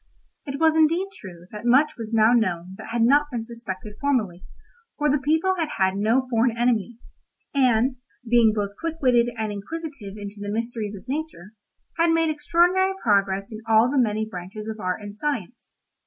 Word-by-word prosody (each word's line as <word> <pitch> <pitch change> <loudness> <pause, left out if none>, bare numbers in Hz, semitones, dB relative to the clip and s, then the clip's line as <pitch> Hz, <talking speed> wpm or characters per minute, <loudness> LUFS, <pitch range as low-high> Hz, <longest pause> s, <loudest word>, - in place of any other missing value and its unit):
It 275 0 -4
was 320 -1 +4
indeed 330 +5 +3
true 175 - -10
that 210 0 -8
much 275 +6 +4
was 225 -2 -7
now 225 +1 +4
known 185 -6 0
that - - -8
had 235 0 +1
not 290 +5 +4
been 240 -4 -3
suspected 215 -3 -8
formerly, 215 -11 0 0.5
for 295 -1 +2
the 290 - +2
people 320 +7 +2
had 320 -2 -1
had 190 0 +2
no 225 +6 +1
foreign 235 -1 +1
enemies, 240 -1 -1 0.4
and, 255 -2 +3 0.3
being 230 -1 +5
both 205 -2 -2
quick 330 -1 -3
witted 240 -4 +3
and 220 -1 -2
inquisitive 215 -1 -7
into 205 0 -8
the 205 0 -5
mysteries 225 -1 -3
of 200 - -12
nature, 270 - -5 0.5
had 335 0 +4
made 330 -1 +2
extraordinary 355 +5 +2
progress 200 -1 +1
in 215 0 -7
all 225 +3 +5
the 285 - +2
many 220 -2 0
branches 205 +2 -8
of 220 0 -5
art 185 +2 -3
and 205 0 -8
science. 245 -3 -4
230 Hz, 180 wpm, -24 LUFS, 210-285 Hz, 0.5 s, being